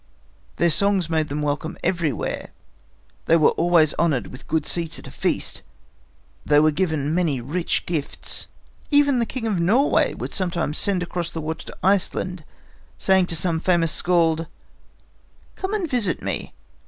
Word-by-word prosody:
Their 170 -1 +2
songs 190 -1 +1
made 155 -1 +1
them 150 +1 -2
welcome 150 +3 -2
everywhere. 165 - -1 0.8
They 165 - +6
were 155 - +5
always 165 -2 +3
honored 140 - +1
with 130 - -12
good 160 -2 0
seats 165 -1 0
at - - -9
a - - -8
feast. - - -1 0.8
They 145 0 +4
were 155 +1 +4
given 155 -3 -1
many 165 -6 +1
rich 155 +9 -2
gifts. 160 -5 -4 0.4
Even 285 -3 +4
the 235 - 0
King 255 -1 -4
of 210 -5 0
Norway 220 +12 +3
would - - -6
sometimes 170 -5 -1
send 190 -3 +1
across 175 -1 -3
the 165 - -6
water 160 +1 -5
to - - -9
Iceland, 185 -2 +1 0.5
saying 190 -2 +3
to 165 - -2
some 165 0 0
famous 170 -2 +2
skald: 165 -2 +1 1.1
"Come 385 +2 -3
and 385 -5 -1
visit 235 - 0
me. - - -4
170 Hz, 155 wpm, -23 LUFS, 155-185 Hz, 1.1 s, They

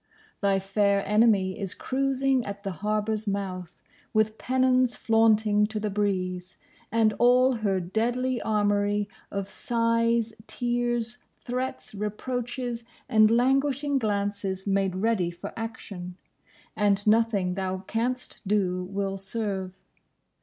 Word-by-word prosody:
Thy 200 -1 +3
fair 200 +1 +1
enemy 210 -3 +3
is 195 -2 -1
cruising 270 -1 0
at 200 -1 -7
the 195 - -2
harbour's 210 +4 -1
mouth, 190 -3 -4 0.3
with 215 0 +2
pennons 255 -1 +2
flaunting 220 -2 +3
to 215 0 -4
the 210 -1 -2
breeze, 185 -3 -2 0.3
and 225 -2 +3
all 250 +1 +5
her 200 -4 0
deadly 240 +7 -1
armoury 205 -1 +1 0.2
of 200 -1 -3
sighs, 230 +1 +1
tears, 240 -1 -1 0.2
threats, 255 -1 -4
reproaches 240 +3 -3 0.2
and 215 -4 +5
languishing 275 +4 +2
glances 200 -3 -1
made 195 -2 +1
ready 195 -3 +1
for 175 0 -8
action; 200 -5 -6 0.6
and 205 -1 +2
nothing 210 -4 +3
thou 190 0 -3
canst 245 +4 -2
do 185 -3 +1
will 195 0 -3
serve. 195 -2 -3
215 Hz, 115 wpm, -27 LUFS, 195-235 Hz, 0.6 s, all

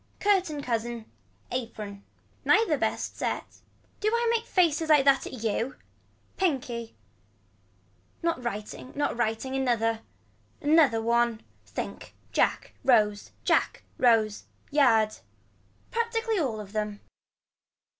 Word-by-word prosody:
Curtain 365 -8 +1
cousin. 235 -2 -2 0.5
Apron. 210 -5 -5 0.4
Neither 430 -8 +4
best 220 -5 -2
set. - - -3 0.4
Do 425 - -1
I 470 +1 +1
make 460 0 -2
faces 325 -3 +2
like 295 -3 +6
that 275 -1 +4
at 245 -4 -8
you. 230 +4 -1 0.6
Pinkie. 250 -10 -1 1.3
Not 335 -7 0
writing 225 +3 -5
not 290 -3 0
writing 240 +3 -1
another. 230 -4 +1 0.6
Another 290 -7 +4
one. 235 -1 +2 0.3
Think. - - -6 0.2
Jack - - +1
Rose 210 -5 +3
Jack - - +1 0.2
Rose. 220 -4 +3 0.3
Yard. 225 -7 +4 0.7
Practically 455 -2 0
all 245 -9 -1
of 205 -1 -9
them. 210 -1 -3
245 Hz, 105 wpm, -28 LUFS, 225-305 Hz, 1.3 s, like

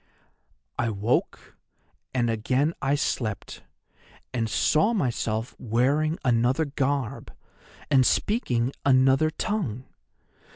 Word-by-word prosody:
"'I 120 - +1
woke, 110 +3 -2 0.5
and 120 -2 0
again 130 +8 0
I 135 +1 +1
slept, 115 -7 -3 0.7
and 115 -3 -1
saw 155 - +2
myself 115 - -1
wearing 140 +8 +1
another 125 +5 +2
garb, 135 -4 -2 0.6
and 135 -2 +6
speaking 125 - +1
another 135 +3 +4
tongue. 155 - -3
130 Hz, 90 wpm, -26 LUFS, 115-145 Hz, 0.7 s, and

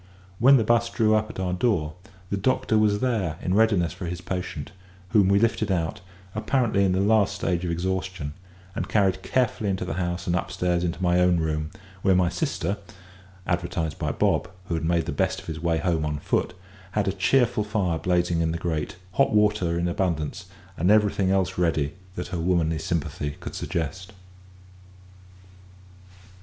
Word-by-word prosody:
When 135 +4 +7
the 115 - +2
'bus 115 +1 +2
drew 110 -1 +2
up 110 0 +1
at - - -8
our 90 -1 -1
door, 90 -6 +1 0.4
the - - +1
doctor 130 +3 +1
was 105 -1 +3
there 105 -11 0
in 90 - -1
readiness 100 -5 +3
for 90 -1 -6
his 90 0 -4
patient, 90 -2 -5 0.4
whom 105 -4 +4
we 100 +1 +4
lifted 110 -1 +1
out, 90 +3 -1 0.3
apparently 110 -2 +1
in 95 -2 +2
the 95 - +1
last 105 0 +3
stage 90 -1 -1
of - - -2
exhaustion, 90 -3 -2 0.4
and - - -3
carried 95 -3 +2
carefully 110 +1 0
into 95 -1 -1
the - - -3
house 85 0 -2
and 85 - +1
upstairs 90 0 -1
into 90 +1 -2
my 90 0 +3
own 90 -1 +4
room, 75 -1 -1 0.3
where 95 -1 +4
my 90 -1 +3
sister 100 - -2 0.7
(advertised 85 -3 -2
by - - -1
Bob, - - +1 0.2
who - - -1
had 80 - -1
made 85 0 +1
the - - -3
best - - 0
of - - -13
his 80 -1 -5
way 85 0 +1
home 85 -2 0
on 75 -1 -1
foot) 75 - -1 0.4
had 105 -2 0
a - - +3
cheerful 115 +3 +2
fire 100 -6 -1
blazing 85 0 +1
in 80 -1 +1
the 85 - -2
grate, 85 -3 -3 0.2
hot 135 +9 +3
water 105 -5 +2
in 85 +1 0
abundance, 85 -4 -2 0.3
and 90 +3 +2
everything 105 -2 +3
else 95 -2 +1
ready 80 -4 +1 0.2
that 90 - -5
her 90 -2 -3
womanly 80 -2 +1
sympathy 75 -3 -3
could - - -7
suggest. 90 +4 -4
90 Hz, 180 wpm, -25 LUFS, 85-105 Hz, 0.7 s, When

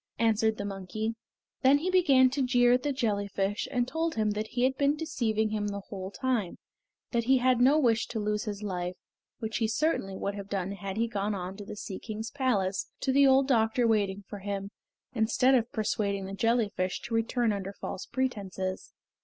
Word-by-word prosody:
answered 220 -1 +2
the 200 - -4
monkey. 200 +3 -3 0.5
Then 270 +2 +6
he 350 +6 -1
began 270 -9 +5
to 275 +1 -1
jeer 245 -1 +4
at 250 - +3
the 290 - -1
jellyfish 205 -5 -1
and 245 -2 0
told 325 +3 -1
him 215 -1 +1
that 215 +1 -3
he 245 +2 -1
had 265 +1 +3
been 285 +1 +2
deceiving 220 -9 -1
him 210 -1 -1
the 200 0 -4
whole 190 -2 -5
time; 230 -4 -1 0.5
that 235 -2 0
he 265 +2 +5
had 250 -1 +3
no 270 +4 +6
wish 230 -6 +2
to 225 - -4
lose 210 +1 -1
his 210 -1 -5
life, 180 -2 -3 0.4
which 220 -2 -3
he 225 - +1
certainly 220 -6 0
would 200 - -2
have 200 -1 -7
done 195 -1 -2
had 200 0 -5
he 230 +1 +1
gone 210 -1 -2
on 185 0 -5
to 205 - -8
the - - -7
Sea 195 -2 -6
King's 220 +1 -6
Palace 205 -9 0
to 265 - +1
the 280 +1 +6
old 265 0 +5
doctor 235 -1 +2
waiting 205 -3 +1
for 205 - -7
him, 200 0 -4 0.4
instead 245 +3 +3
of 240 -2 +2
persuading 200 -3 -1
the 195 - -6
jellyfish 205 -3 0
to 235 - -7
return 225 0 +1
under 195 -1 -4
false 195 - -6
pretences. 200 -7 -3
220 Hz, 200 wpm, -29 LUFS, 200-255 Hz, 0.5 s, Then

